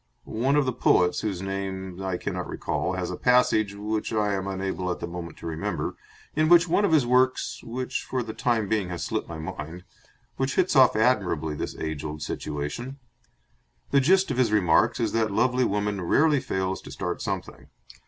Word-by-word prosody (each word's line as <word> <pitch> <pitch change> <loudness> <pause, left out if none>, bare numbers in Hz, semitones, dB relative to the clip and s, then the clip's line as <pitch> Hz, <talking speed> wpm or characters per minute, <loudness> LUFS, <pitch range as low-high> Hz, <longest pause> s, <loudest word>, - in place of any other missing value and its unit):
One 130 +6 0
of 145 -2 +3
the 130 - 0
poets, 90 -6 +3
whose 95 -4 -3
name 95 -1 -4
I 95 -2 -2
cannot - - -4
recall, - - -2
has - - -3
a - - -3
passage, 110 -5 +3
which 105 +1 -3
I 105 -2 +1
am 95 0 -2
unable 95 -1 -3
at 90 - -2
the - - -3
moment 85 -1 -7
to - - -11
remember, 80 -1 -3 0.4
in 155 +1 +2
one 175 +3 +5
of 200 - +1
his 150 -6 +4
works, 130 +1 +2
which 125 +2 -3
for 130 -1 -2
the 110 -1 -6
time 115 -4 0
being 100 -3 0
has 85 -1 -4
slipped - - -3
my 80 - -6
mind, 80 +2 -7 0.5
which 135 0 -1
hits 185 -3 +2
off 130 -4 +6
admirably 95 -10 +1
this 75 - -5
age 80 -2 -4
old 75 0 -5
situation. 75 - -4 0.9
The 140 - +5
gist 185 +4 +3
of 130 - -2
his 125 -4 +3
remarks 90 -6 +3
is - - 0
that 110 -1 +1
lovely 125 +5 +2
woman 105 -1 -1
rarely 145 - +3
fails 95 -4 -2
to - - -11
start - - -4
something. - - -5
105 Hz, 190 wpm, -26 LUFS, 90-130 Hz, 0.9 s, off